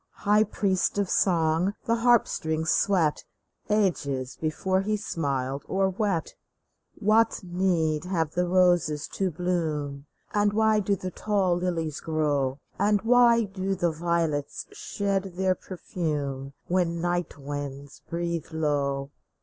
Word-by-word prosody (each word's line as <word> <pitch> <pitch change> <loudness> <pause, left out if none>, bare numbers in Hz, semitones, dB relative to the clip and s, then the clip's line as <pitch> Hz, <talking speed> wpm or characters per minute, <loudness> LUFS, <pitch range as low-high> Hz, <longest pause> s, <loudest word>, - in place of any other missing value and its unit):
High 210 +1 +5
priests 195 -2 0
of 200 -2 0
song 170 +1 +2
the 230 0 +2
harp 240 0 +4
strings 160 0 -1
swept 175 -7 +2 0.5
Ages 140 -11 0
before 185 +4 0
he 210 +2 0
smiled 140 -8 -2
or 190 0 +1
wept 190 -3 -1
I - - -47 0.3
" - - -49
What 220 0 +3
need 175 -4 0
have 165 -4 -1
the 180 +2 0
roses 175 -5 +3
to 190 -1 -1
bloom? 155 -5 -2 0.3
And 205 0 +2
why 220 0 +3
do 200 0 +1
the 185 0 -5
tall 195 -2 +1
lilies 170 -4 -2
grow? 145 -4 0 0.2
And 205 0 +2
why 235 0 +5
do 195 -1 -2
the 175 -2 +1
violets 160 -3 -1
shed 195 -2 -2
their 190 0 +2
perfume 145 -8 -4
When 175 -2 0
night 175 -2 -1
winds 140 0 -6
breathe 170 -1 -2
low 140 -3 -1
175 Hz, 135 wpm, -26 LUFS, 155-195 Hz, 0.5 s, High